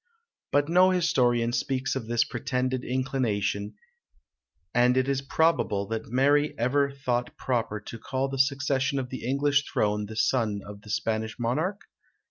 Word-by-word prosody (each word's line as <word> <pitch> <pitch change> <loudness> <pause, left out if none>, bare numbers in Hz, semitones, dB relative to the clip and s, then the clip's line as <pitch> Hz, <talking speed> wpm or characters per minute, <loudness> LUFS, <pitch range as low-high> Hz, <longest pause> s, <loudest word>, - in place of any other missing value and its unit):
But 145 0 +3
no 180 +3 +5
historian 125 -10 +2
speaks 135 +1 -1
of 125 -4 -4
this 120 0 +2
pretended 130 0 -2
inclination, 115 -6 -1 1.0
and 125 +1 +4
is 135 +1 +1
it 135 - -21
probable 160 -11 +2
that 115 0 -3
Mary 145 +4 +2
ever 140 +4 +2
thought 125 -3 -2
proper 115 -4 -1
to 115 +2 -9
call 130 +3 -2
to - - -8
the 135 - -3
succession 140 0 0
of 125 -2 -3
the 130 - -6
English 140 +3 +2
throne 105 0 0
the 110 - -8
son 110 -3 +1
of 100 0 -10
the 105 - -14
Spanish 110 +1 -2
Monarch? 155 - -1
130 Hz, 155 wpm, -27 LUFS, 115-140 Hz, 1.0 s, no